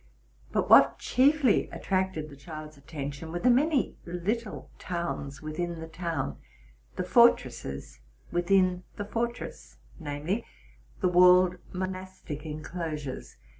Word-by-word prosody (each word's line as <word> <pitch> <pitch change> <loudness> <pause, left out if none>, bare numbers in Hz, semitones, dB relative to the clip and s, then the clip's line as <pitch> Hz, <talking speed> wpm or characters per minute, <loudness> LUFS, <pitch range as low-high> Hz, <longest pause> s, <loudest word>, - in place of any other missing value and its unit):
But - - 0
what - - +7
chiefly 270 -2 +3
attracted 185 -5 -1
the - - -10
child's 155 +1 -9
attention, 145 +2 -6
were 175 - -2
the 250 +8 +4
many 280 +2 +2
little 210 +6 -3
towns 160 -6 -4
within 170 +2 -3
the 160 - -6
town, 165 -4 -3 0.6
the 185 - -1
fortresses 130 - +2 0.3
within 180 +1 +3
the 205 - -4
fortress; 235 +3 -4 0.2
viz., 155 +7 -2 0.6
the 185 - +3
walled 180 0 +6
monastic 185 -5 -5
en 155 0 -5
closures. 155 -6 -5
175 Hz, 115 wpm, -28 LUFS, 155-190 Hz, 0.6 s, what